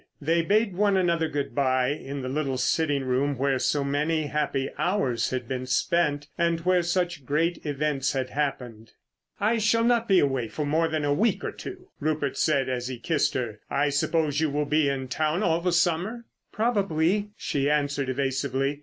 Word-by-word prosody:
They 165 +3 +2
bade 205 +4 +2
one 200 0 +3
another 170 -3 +2
good 145 -2 -3
bye 130 -2 +2
in 140 -2 -4
the - - -3
little 135 -1 -1
sitting 145 +1 +1
room 135 +2 0
where 135 0 +1
so 145 +2 +1
many 150 +3 0
happy 145 -2 -1
hours 135 - 0
had 130 -2 -3
been 130 0 -4
spent—and 160 +3 0
where 180 +1 +3
such 175 -3 -1
great 160 +6 0
events 145 -2 0
had 130 -2 -2
happened. 125 -6 -3 0.5
"I 220 +3 +2
shall 220 +2 +2
not 235 -1 +2
be 195 - +5
away 135 -7 +1
more 155 +2 +1
than 155 -2 -1
a 145 - +2
week 220 +10 +1
or - - -2
two," 375 0 -9
Rupert 150 -2 -1
said 140 -4 +1
as 125 -1 -2
he 130 -1 -5
kissed 150 +7 0
her. 115 -5 -3
"I 145 +1 +1
suppose 150 +1 +1
you 160 - +2
will 145 +1 -1
be 150 0 +2
in 135 -1 -3
town 155 +8 0
all 170 -2 +2
the 180 +1 +1
summer?" 175 +7 0 0.3
"Probably," 205 -3 +1
she 140 0 -1
answered 145 -2 0
evasively. 135 +1 -1
150 Hz, 180 wpm, -26 LUFS, 135-170 Hz, 0.5 s, be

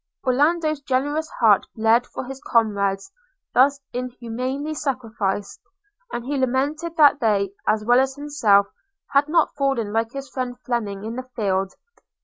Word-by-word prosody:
Orlando's 305 +3 +2
generous 290 +4 -1
heart 215 -4 +4
bled 225 +2 +3
for - - -6
his 270 +2 -8
comrades 205 - 0 0.4
thus 275 +3 +4
inhumanly 255 +4 -4
sacrificed; 225 -9 -3 0.5
and 240 - -4
he 285 +2 -2
lamented 290 +6 -1
that 290 -2 +6
they, 205 -5 +1 0.2
as 215 0 +1
well 245 +2 +5
as 265 0 +1
himself, 280 -9 +3 0.5
had 285 +2 +3
not 330 0 +2
fallen 265 -7 -1
like 225 +1 0
his 275 0 -6
friend 250 -2 -4
Fleming 210 -5 -2
in 225 +2 -5
the 255 0 -7
field. 195 -4 -1
255 Hz, 140 wpm, -23 LUFS, 220-280 Hz, 0.5 s, that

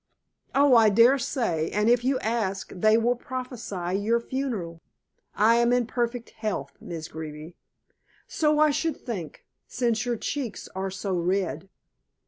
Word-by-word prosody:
"Oh, 280 -2 +6
I 225 -2 +7
daresay, 230 - +2
and 210 +1 0
if 240 0 +4
you 265 +1 +2
ask 215 -4 -2
they 215 +4 +4
will 240 +2 +2
prophesy 235 -8 -4
your 230 +3 +2
funeral." 230 -11 -4 0.5
"I 230 +2 +4
am 235 0 +3
in 245 -1 +2
perfect 240 0 -3
health, 200 -11 -4
Miss 165 -2 -6
Greeby." 155 +1 -8 0.7
"So 300 -1 +1
I 305 0 +5
should 310 +1 -1
think, 185 - -7 0.2
since 235 -3 0
your 240 -1 -1
cheeks 255 -2 -4
are 190 +1 -3
so 195 +1 -4
red." 185 +2 -1
225 Hz, 140 wpm, -26 LUFS, 190-245 Hz, 0.7 s, I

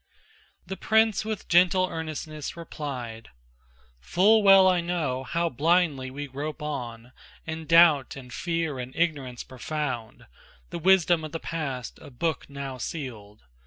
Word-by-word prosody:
The 190 - -6
prince 220 -2 +2
with 215 -2 -5
gentle 185 +1 +4
earnestness 155 -2 -6
replied: 130 -9 -6 0.7
"Full 205 - +4
well 195 -2 +7
I 180 -2 +3
know 160 -7 -2
how 170 +6 -1
blindly 155 -2 +1
we 145 +2 -6
grope 145 +3 -6
on 125 -5 -5 0.3
In 160 0 -6
doubt 165 -5 +5
and 125 -3 -10
fear 165 -4 -2
and 125 +1 -7
ignorance 140 -7 -1
profound, 130 -4 -5 0.5
The 170 - -4
wisdom 175 -2 +4
of 155 0 -7
the 165 - -3
past 140 -8 -5
a 155 - -11
book 150 +5 -3
now 140 -2 -6
sealed. 110 - -7
155 Hz, 135 wpm, -26 LUFS, 130-170 Hz, 0.7 s, well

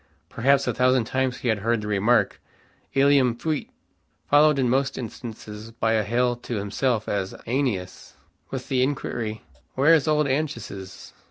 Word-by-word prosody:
Perhaps 135 +3 +2
a - - 0
thousand 130 -1 +3
times 130 +2 -1
he 125 - -2
had 110 -2 +1
heard 115 +2 0
the 105 - -5
remark, 105 +4 +2 0.5
"Ilium 135 -3 +4
fuit," 155 +2 -2 0.6
followed 150 0 +5
in 130 -2 +2
most 135 +3 +1
instances 110 -2 -8
by 115 0 0
a 110 - +3
hail 120 +3 +1
to 120 0 -6
himself 110 +3 -1
as 95 -2 -2
"AEneas," 115 -8 -2 0.4
with - - -5
the 130 -2 +1
inquiry 120 -5 -2 0.3
"Where 140 +5 +5
is 155 -3 +3
old 150 -1 +2
Anchises?" 115 -10 -4
125 Hz, 155 wpm, -24 LUFS, 110-135 Hz, 0.6 s, followed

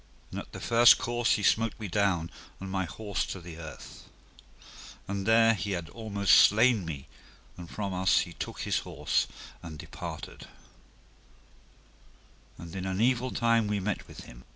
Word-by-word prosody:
And - - -4
at - - -10
the - - -8
first 120 0 +6
course 120 0 +1
he 105 - -1
smote 115 +4 +2
me 110 - -4
down 90 -3 0 0.3
and 95 0 -7
my 95 -1 -1
horse 100 +4 -3
to 95 - -5
the 85 -2 -10
earth. 80 -2 -10 1.0
And 100 +1 -3
there 115 0 +5
he 100 -1 -3
had 85 -3 -4
almost 100 -3 +3
slain 110 -2 +4
me, 70 -5 -6 0.5
and 85 -2 -10
from 100 -2 -4
us 95 +1 +3
he 85 - -6
took - - -6
his - - 0
horse - - -1 0.3
and 80 -2 -8
departed, 80 +1 -8 2.1
and 85 0 -10
in 95 0 -4
an 95 0 -2
evil 125 +2 +2
time 115 -3 +2
we 105 -1 0
met 100 0 -3
with - - -11
him. - - -13
100 Hz, 165 wpm, -29 LUFS, 85-115 Hz, 2.1 s, first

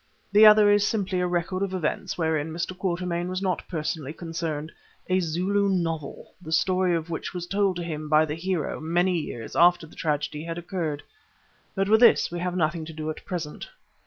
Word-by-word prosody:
The 210 +2 +8
other 210 -1 +7
is 205 0 +4
simply 195 -4 -1
a 180 - +1
record 180 +2 -1
of 195 -1 -1
events 165 -5 -2
wherein 160 -2 0
Mr. 170 +3 -4
Quatermain 175 -2 -2
was 185 0 -2
not 185 -3 -1
personally 155 -3 -3
concerned—a 165 +2 -4
Zulu 185 +4 0
novel, 165 -5 -3
the 160 - -9
story 185 +1 +2
of 165 +1 -4
which 165 - -5
was 175 -1 -3
told 195 0 +1
to 175 - -4
him 155 -2 -5
by 155 0 +5
the 150 - -4
hero 170 -1 -2
many 175 +3 +1
years 120 -7 -7
after 175 0 +5
the 160 - -16
tragedy 150 -2 -2
had 165 0 -5
occurred. 170 -4 -3 0.7
But 195 0 0
with 220 +2 +5
this 240 - +5
we 175 - -4
have 180 0 -2
nothing 165 -1 0
to 160 - -9
do 155 0 -4
at 155 - -10
present. 165 -5 -5
175 Hz, 190 wpm, -26 LUFS, 160-185 Hz, 0.7 s, The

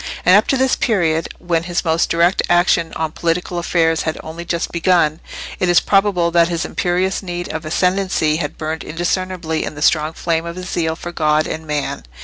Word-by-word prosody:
And 180 - +7
up 210 - +4
to 270 - +2
this 260 0 +2
period, 165 -7 0
when 170 -1 -1
his 175 0 -2
more 160 -1 +2
direct 170 +3 +2
action 175 -1 +3
on 160 -1 -2
political 175 +2 -2
affairs 165 -2 +1
had 160 - -2
only 160 +2 -7
just 170 -1 -2
begun, 170 -2 +2 0.4
it 180 - +1
is 175 - +6
probable 195 -4 +2
that 170 0 +4
his 170 -2 -2
imperious 185 +2 -1
need 175 -2 -5
of 160 0 -5
ascendancy 180 -2 +1
had 150 -3 -4
burned 160 +1 -4
undiscernibly 175 0 -2
in - - -5
the 150 - -8
strong 155 0 +2
flame 165 0 -1
of 170 - -6
his 185 0 -7
zeal 160 -2 -1
for 175 +1 -7
God 155 -2 +1
and 160 0 -5
man. 150 -1 -3
170 Hz, 195 wpm, -18 LUFS, 160-180 Hz, 0.4 s, And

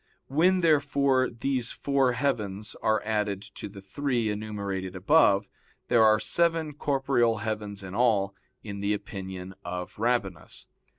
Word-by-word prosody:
When, 180 +7 +3
therefore, 140 -4 +3
these 120 0 -1
four 135 -3 +1
heavens 105 -7 -2
are 110 -1 +1
added 105 -2 -1
to - - -7
the 100 0 -11
three 120 +1 -1
enumerated 100 -3 -4
above, 100 - +4 0.4
there 120 -2 +5
are 110 0 +5
seven 165 -1 +1
corporeal 135 -5 +1
heavens 105 -2 -3
in 95 0 -8
all, 105 -4 +2 0.3
in 100 -2 -6
the 100 +1 +1
opinion 95 -2 -7
of 90 +2 -6
Rabanus. 110 -8 -2
110 Hz, 130 wpm, -27 LUFS, 100-135 Hz, 0.4 s, there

